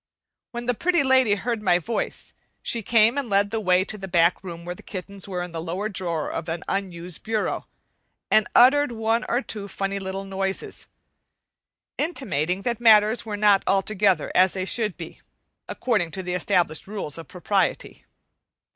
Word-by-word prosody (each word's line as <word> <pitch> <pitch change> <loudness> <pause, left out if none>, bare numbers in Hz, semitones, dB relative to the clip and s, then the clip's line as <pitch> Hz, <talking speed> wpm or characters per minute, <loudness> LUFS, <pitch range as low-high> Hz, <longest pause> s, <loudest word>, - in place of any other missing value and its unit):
When 240 0 -6
the 245 - +1
Pretty 345 +5 +1
Lady 260 -5 +4
heard 230 +1 -3
my 180 -4 +3
voice, 220 +7 -4 0.3
she 235 - +1
came 225 +4 +3
and 265 -4 -4
led 200 0 +2
the 225 - -1
way 185 -2 +2
to 210 +1 -5
the 195 - -6
back 175 0 +2
room 170 -2 -8
where 175 - -4
the - - -14
kittens 195 0 -7
were 180 -2 -3
in 180 - -7
the 165 -1 -5
lower 180 +6 -3
drawer 170 -6 -3
of 165 0 -5
an 165 +2 -3
unused 180 -3 -3
bureau, 220 -1 -2 0.6
and 215 - +4
uttered 270 +2 +6
one 225 0 0
or 245 +3 +1
two 205 -2 -6
funny 195 0 -3
little 190 0 -5
noises, 195 0 -3 1.1
intimating 195 - 0
that 240 -2 -1
matters 220 0 +5
were 210 -1 -3
not 205 -2 +4
altogether 195 -3 +2
as 185 0 +4
they 185 -1 -3
should 215 -1 0
be, 165 -2 -9 0.5
according 210 -9 0
to 190 - -5
established 175 -2 +1
rules 195 -7 -5
of 165 - -10
propriety. 190 +2 -2
195 Hz, 170 wpm, -24 LUFS, 180-225 Hz, 1.1 s, uttered